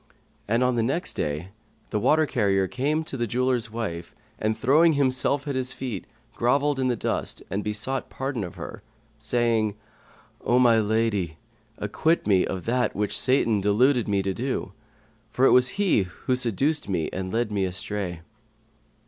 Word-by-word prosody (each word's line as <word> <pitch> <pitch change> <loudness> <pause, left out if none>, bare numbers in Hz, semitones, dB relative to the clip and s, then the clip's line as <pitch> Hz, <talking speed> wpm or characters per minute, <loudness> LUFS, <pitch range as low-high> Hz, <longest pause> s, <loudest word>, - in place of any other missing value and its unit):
And 115 +4 +2
on 125 -1 +1
the - - +3
next 135 +10 -1
day, 75 +5 -3 0.4
the 105 - 0
water 155 +8 +3
carrier 100 -8 +1
came 140 +8 0
in - - -3
to 140 - -5
the 120 -1 -1
jeweller's 125 0 0
wife 105 -7 -5 0.2
and, 110 0 0
throwing 155 +8 +4
himself 140 +1 +1
at 140 - -1
her 130 0 0
feet, 125 -5 -5 0.3
grovelled 140 +3 +1
in 130 - +1
the 125 - +1
dust - - -2
and 100 +2 -1
besought 110 +6 -3
pardon 135 -4 -3
of 85 - -7
her, - - -8 0.4
saying, 115 -3 +1 0.7
"O 120 - +3
my 120 -3 +5
lady, 105 -6 0 0.4
acquit 165 +2 0
me 95 -3 +3
of 95 -1 -4
that 125 +1 0
which 105 0 -1
Satan 115 -5 +2
deluded 120 +5 +3
me 100 -2 +1
to 95 0 -1
do; 120 -4 -3 0.6
for 125 +3 +2
it - - +6
was 125 0 +6
he 180 - +2 0.2
that 130 - +2
seduced 125 +4 0
me 85 -5 0
and 95 0 -4
led 115 -1 0
me 100 -2 0
astray." 95 -2 -4
115 Hz, 170 wpm, -25 LUFS, 100-130 Hz, 0.7 s, it